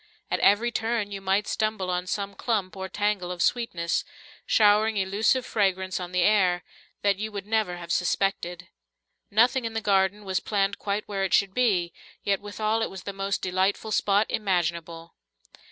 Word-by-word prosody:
At - - +1
every 220 +4 +4
turn 225 -2 -1
you 195 -1 -5
might 195 +2 +1
stumble 215 -4 -1
on 180 0 -2
some 200 +1 -3
clump 200 -3 -2
or 190 0 -5
tangle 205 -4 -1
of 180 - -6
sweetness, 175 -9 0 0.4
showering 215 0 +4
elusive 205 +6 +1
fragrance 190 -3 0
on 180 -1 -6
the 180 -1 +2
air, 185 -3 +3 0.4
that 200 -1 +3
you 215 +1 -3
would 200 -1 -6
never 210 -4 0
have 170 -1 -7
suspected. 180 -1 -1 0.6
Nothing 240 +4 +3
in 225 -1 -4
the 225 - -1
garden 200 0 +1
was 190 -1 0
planted 200 -1 -1
quite 205 +1 -2
where 195 -2 -2
it 195 - +3
should 195 -1 +2
be, 190 -9 +1 0.3
yet 200 -1 0
withal 215 +2 -1
it 225 - 0
was 190 -2 -9
the 200 - -5
most 195 0 -2
delightful 190 +4 0
spot 205 0 +3
imaginable. 170 -4 -2
200 Hz, 170 wpm, -26 LUFS, 185-215 Hz, 0.6 s, every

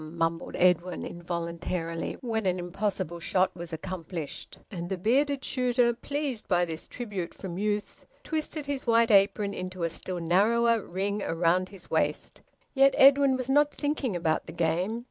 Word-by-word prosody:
mumbled 165 +1 -2
Edwin 180 0 +2
involuntarily, 170 -1 -4
when 225 -4 -1
an 185 0 +1
impossible 175 -1 -3
shot 185 +2 +1
was 170 -1 -7
accomplished; 165 -1 -6
and 175 -3 -5
the 190 - -2
bearded 270 +8 +1
shooter, 245 -1 +2
pleased 275 -1 -3
by 175 -2 +3
this 160 -2 -5
tribute 205 -8 -5
from 185 -2 -6
youth, 210 0 -3 0.2
twisted 310 -1 -3
his 280 -3 -3
white 230 0 +4
apron 200 0 +4
into 185 -1 -5
a 165 - 0
still 180 +2 -3
narrower 225 +7 +3
ring 200 +3 -2
round 180 0 +1
his 195 -3 -7
waist. - - -1 0.3
Yet 275 0 +5
Edwin 275 -1 +6
was 255 -1 -4
not 290 +2 +4
thinking 290 -8 -2
about 165 -2 0
the 160 - -8
game. 175 +7 0
190 Hz, 155 wpm, -28 LUFS, 170-235 Hz, 0.3 s, Edwin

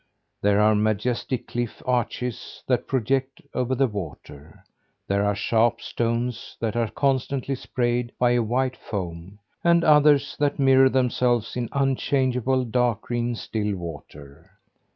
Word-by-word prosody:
There 100 0 +3
are 105 +1 +5
majestic 110 +4 -1
cliff 120 -1 -4
arches 125 -1 -2
that 125 -2 0
project 135 +3 -1
over 125 +1 0
the 135 - +3
water. 80 - -8 0.4
There 100 +1 +1
are 105 0 +1
sharp 115 +3 +2
stones 115 0 -3
that 115 -1 -2
are 115 -2 0
constantly 135 0 -1
sprayed 120 -2 -1
by 125 -1 +3
a 120 0 +3
white 130 +3 0
foam; 90 -1 -6 0.3
and 170 0 +4
others 150 -2 +4
that 145 -1 +1
mirror 135 -1 +5
themselves 125 -3 +1
in 120 -2 -2
unchangeable 130 -2 +1
dark 120 -1 +1
green 120 0 -2
still 105 -2 -3
water. 75 -5 -10
120 Hz, 130 wpm, -24 LUFS, 105-130 Hz, 0.4 s, are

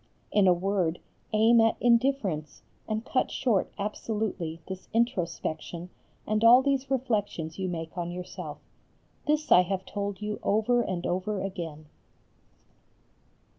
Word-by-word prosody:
In 205 -2 +4
a - - +7
word 180 -2 0 0.3
aim 225 +2 +5
at 225 0 +3
indifference 235 - +1 0.2
and 220 +1 -2
cut 255 - +1
short 225 -8 +1
absolutely 205 -5 -3
this 190 -1 -7
introspection 175 -5 -1 0.3
and 215 +1 0
all 245 +3 +8
these 275 -1 0
reflections 205 -11 -1
you 190 - -1
make 165 -2 -5
on 175 -1 -3
yourself. 180 +1 -6 0.7
This 300 +1 +1
I 180 - +9
have 190 +1 -2
told 200 -1 -4
you 210 0 -4
over 220 +4 +2
and 185 -6 -3
over 190 +3 -1
again. 165 -6 -5
200 Hz, 130 wpm, -28 LUFS, 175-230 Hz, 0.7 s, I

